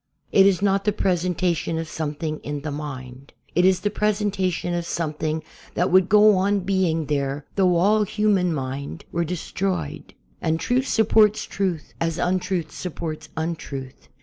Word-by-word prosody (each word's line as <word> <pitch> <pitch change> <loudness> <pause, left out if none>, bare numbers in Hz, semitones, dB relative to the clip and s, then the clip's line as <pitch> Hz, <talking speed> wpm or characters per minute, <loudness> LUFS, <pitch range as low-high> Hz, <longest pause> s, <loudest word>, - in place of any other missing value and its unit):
It 195 0 +6
is 195 -1 +2
not 195 0 +2
the 210 - +2
presentation 180 -3 0
of 165 0 -3
something 155 0 -3
in 145 0 -5
the 155 0 -4
mind. 135 -2 -7 0.2
It 180 +2 +3
is 185 -1 +4
the 205 - 0
presentation 200 -5 0
of 170 -1 -2
something 155 -1 -2 0.3
that 180 - +1
would 185 0 +5
go 210 -1 +6
on 200 +1 +2
being 180 -4 +1
there 140 -1 -2
though 185 -3 +3
all 205 +5 +4
human 205 -3 +2
mind 135 - -4
were 170 - 0
destroyed. 180 - -3 0.3
And 160 0 0
truth 255 +6 +1
sup 220 -3 +2
ports 215 -1 +5
truth, 185 -6 -3
as 165 0 0
untruth 180 -3 -1
supports 160 -2 -6
untruth. 155 -5 -5
175 Hz, 155 wpm, -23 LUFS, 155-195 Hz, 0.3 s, It